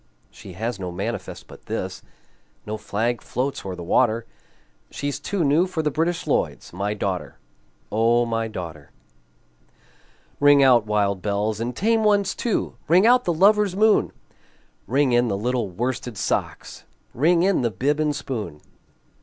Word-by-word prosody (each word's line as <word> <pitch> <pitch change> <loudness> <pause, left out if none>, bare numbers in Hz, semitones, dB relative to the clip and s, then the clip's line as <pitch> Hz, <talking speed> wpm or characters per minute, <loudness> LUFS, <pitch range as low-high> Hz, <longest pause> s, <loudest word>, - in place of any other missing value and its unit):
She 100 -3 -12
has 110 +3 -4
no 90 -2 -4
manifest 85 - -5
but - - -15
this, - - -4 0.6
No 105 - -4
flag 115 +3 -2
floats 135 +3 -3
o'er 95 -2 -5
the 90 - -8
water, 115 +5 +2 0.6
She's 145 -1 -4
too 185 +4 -2
new 155 +6 +3
for 170 -4 -3
the 150 - 0
British 165 +4 -1
Lloyds - - -1
My 100 +3 -2
daughter, 95 -3 -3 0.5
O 115 +2 +3
my 115 -1 -1
daughter! 85 -8 -8 1.5
Ring 145 -1 +6
out, 120 -5 +5
wild 100 -2 0
bells, 105 +1 -1
and 120 +1 -3
tame 225 - +2
ones 205 -3 +2
too! 235 - -2
Ring 180 +6 +5
out 250 +1 +5
the 175 - +2
lover's 200 +2 +4
moon! 215 +1 +3 0.8
Ring 135 +1 +2
in 120 0 +3
the 100 -3 -1
little 120 0 -1
worsted 120 +3 -4
socks! - - -3 0.3
Ring 170 +6 +3
in 195 -4 +2
the 120 - +1
bib 140 +9 -1
and 150 -1 +1
spoon! 110 - -5
120 Hz, 155 wpm, -23 LUFS, 105-160 Hz, 1.5 s, Ring